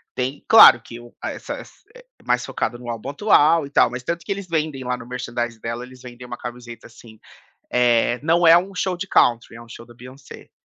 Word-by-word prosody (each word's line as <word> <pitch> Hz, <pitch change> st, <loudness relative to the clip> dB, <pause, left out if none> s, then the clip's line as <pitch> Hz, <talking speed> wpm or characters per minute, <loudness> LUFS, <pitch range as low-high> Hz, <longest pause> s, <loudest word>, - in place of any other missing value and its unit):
tem 130 Hz, +3 st, -4 dB
claro 130 Hz, -, +8 dB
que 115 Hz, +1 st, -11 dB
o 120 Hz, 0 st, -15 dB
essa -, -, -6 dB
ess -, -, -15 dB, 0.2 s
é -, -, -15 dB, 0.2 s
mais -, -, 0 dB
focado 120 Hz, +2 st, -4 dB
no 120 Hz, -1 st, -9 dB
álbum 115 Hz, +2 st, -6 dB
atual 160 Hz, -2 st, +3 dB
e -, -, -11 dB
tal, -, -, +3 dB
mas 125 Hz, +1 st, -7 dB
tanto 170 Hz, +4 st, -4 dB
que -, -, -5 dB
eles 200 Hz, -1 st, -5 dB
vendem 155 Hz, -5 st, -3 dB
lá 125 Hz, 0 st, -3 dB
no 115 Hz, -, -12 dB
merchandise 120 Hz, -2 st, -5 dB
dela, 115 Hz, +1 st, -5 dB
eles 130 Hz, 0 st, -16 dB
vendem 125 Hz, 0 st, -12 dB
uma 120 Hz, -, -7 dB
camiseta 120 Hz, -1 st, -10 dB
assim, 115 Hz, -1 st, -17 dB, 0.5 s
eh: 120 Hz, 0 st, +2 dB
"Não 170 Hz, +2 st, +2 dB
é 165 Hz, +1 st, +8 dB
um 190 Hz, +3 st, -3 dB
show 180 Hz, 0 st, -2 dB
de 195 Hz, +3 st, -6 dB
country, 120 Hz, -9 st, +1 dB
é -, -, -12 dB
um 115 Hz, -, -16 dB
show 115 Hz, -, -11 dB
da 120 Hz, -, -17 dB
Beyoncé." 130 Hz, +3 st, -14 dB
125 Hz, 225 wpm, -21 LUFS, 120-160 Hz, 0.5 s, claro